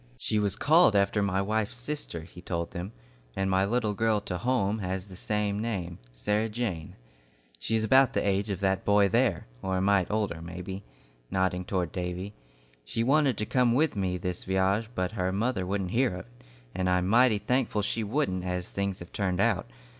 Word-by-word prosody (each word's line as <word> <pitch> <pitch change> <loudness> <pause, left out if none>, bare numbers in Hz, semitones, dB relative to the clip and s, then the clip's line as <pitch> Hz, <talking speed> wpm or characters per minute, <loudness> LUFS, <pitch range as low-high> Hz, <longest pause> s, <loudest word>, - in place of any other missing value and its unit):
"She 110 - 0
was 100 -2 0
called 155 - +5
after 100 +1 +3
my 100 -1 +1
wife's 110 +2 -1
sister," 125 - -4
he 85 +2 -12
told 85 -2 -3
them, 90 +4 -5 0.4
"and 95 0 0
my 95 +1 +3
little 110 0 0
girl 110 +1 +2
to 90 -3 -4
home 110 -4 +1
has 95 0 -3
the 95 - -10
same 105 +1 -1
name, 95 -7 -3
'Sarah 105 - 0
Jane.' 105 -8 -3 0.6
She 115 - -1
is 110 - +1
about 130 +3 +5
the - - 0
age 100 +2 +1
of 100 -1 -3
that 95 -1 +1
boy 100 -1 +4
there, 115 -5 +2 0.2
or 95 -1 -1
a - - +1
mite 100 -2 +3
older 105 -6 -1
maybe," 90 +3 -6 0.5
nodding 95 -1 0
toward 90 -2 -1
Davy. 90 +2 -4 0.5
"She - - -2
wanted 135 -2 +3
to 105 - -1
come 125 0 +2
with 155 0 +2
me 95 -2 -1
this 90 -1 -4
vy'age, 95 +3 +1
but 90 0 -1
her 95 -4 -1
mother 100 -1 -1
wouldn't 95 -2 -2
hear 120 -3 +2
of - - -5
it, 120 - -24 0.4
and 90 0 0
I'm 90 0 +2
mighty 115 +1 +5
thankful 110 0 0
she 110 +2 -1
wouldn't, 105 -5 -1
as 90 -1 -3
things 100 -1 -2
have 85 - -10
turned 95 -3 -1
out. 110 -2 +1
100 Hz, 195 wpm, -28 LUFS, 90-110 Hz, 0.6 s, called